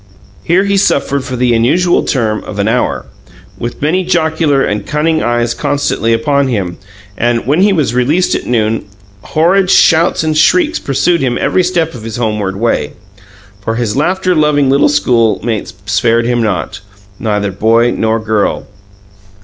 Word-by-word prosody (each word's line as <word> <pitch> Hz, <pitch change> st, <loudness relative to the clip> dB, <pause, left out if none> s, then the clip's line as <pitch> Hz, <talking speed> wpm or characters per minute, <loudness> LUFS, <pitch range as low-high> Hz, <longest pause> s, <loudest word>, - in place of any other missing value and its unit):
Here 180 Hz, +3 st, +2 dB
he 200 Hz, 0 st, 0 dB
suffered 140 Hz, -7 st, +1 dB
for 130 Hz, -1 st, -5 dB
the 125 Hz, -1 st, +1 dB
unusual 165 Hz, +11 st, +2 dB
term 110 Hz, -5 st, -1 dB
of 100 Hz, -, -8 dB
an 100 Hz, +1 st, 0 dB
hour, 125 Hz, +3 st, -1 dB, 0.5 s
with 120 Hz, +4 st, -6 dB
many 180 Hz, +5 st, +1 dB
jocular 160 Hz, -5 st, +1 dB
and 105 Hz, 0 st, -2 dB
cunning 155 Hz, +1 st, 0 dB
eyes 120 Hz, 0 st, 0 dB
constantly 140 Hz, -5 st, -1 dB
upon 140 Hz, +3 st, +1 dB
him; 95 Hz, -8 st, -3 dB, 0.4 s
and, 120 Hz, +1 st, -1 dB
when 145 Hz, +8 st, +1 dB
he 205 Hz, +1 st, +4 dB
was 155 Hz, -, 0 dB
released 145 Hz, +9 st, +1 dB
at -, -, -3 dB
noon, 110 Hz, -3 st, 0 dB, 0.4 s
horrid 180 Hz, -, +1 dB
shouts 165 Hz, -3 st, +3 dB
and 155 Hz, -1 st, -1 dB
shrieks 315 Hz, -, +2 dB
pursued 155 Hz, +5 st, 0 dB
him 125 Hz, -2 st, 0 dB
every 185 Hz, -, +1 dB
step 175 Hz, -3 st, -1 dB
of 120 Hz, -, -9 dB
his 110 Hz, 0 st, -6 dB
homeward 105 Hz, -5 st, -2 dB
way. 115 Hz, +4 st, -1 dB, 0.7 s
For 115 Hz, +2 st, -2 dB
his 115 Hz, -3 st, -2 dB
laughter 185 Hz, +5 st, 0 dB
loving 150 Hz, -4 st, +2 dB
little 140 Hz, +2 st, +3 dB
schoolmates 115 Hz, -5 st, 0 dB
spared 115 Hz, +2 st, +1 dB
him 120 Hz, 0 st, 0 dB
not 105 Hz, -7 st, -2 dB, 0.4 s
neither 105 Hz, -3 st, -1 dB
boy 115 Hz, +5 st, +2 dB
nor 110 Hz, 0 st, 0 dB
girl. 110 Hz, -2 st, -1 dB
125 Hz, 155 wpm, -13 LUFS, 115-160 Hz, 0.7 s, he